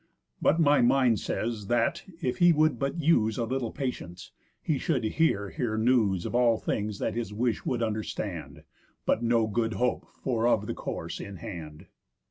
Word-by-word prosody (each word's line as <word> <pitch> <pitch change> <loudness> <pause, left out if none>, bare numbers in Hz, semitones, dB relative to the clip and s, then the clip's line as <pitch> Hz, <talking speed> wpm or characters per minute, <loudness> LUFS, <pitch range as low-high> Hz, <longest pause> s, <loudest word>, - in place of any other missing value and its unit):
But 165 - +3
my 145 -2 +5
mind 125 -2 +4
says, 110 -3 -3
that, 120 - +1 0.2
if 125 - -1
he 175 -1 +7
would 155 -5 +2
but 140 +5 -2
use 115 -9 +3
A 115 - 0
little 125 0 -2
patience, 90 -11 -5 0.3
he 150 -4 -1
should 135 -8 0
here 110 -5 +1
hear 120 -7 -2
news 110 -6 +2
Of - - -4
all 120 -2 +4
things 105 -1 -2
that - - -2
his 115 -3 -3
wish 115 +2 -1
would 120 -2 0
understand, 110 -1 -4 0.4
But - - +2
no 115 -1 +3
good 115 +1 -1
hope 125 0 -1 0.2
for 120 -3 +1
of 105 -3 +2
the - - -3
course - - -5
in 100 - -7
hand." 80 -5 -8
120 Hz, 175 wpm, -28 LUFS, 110-130 Hz, 0.4 s, he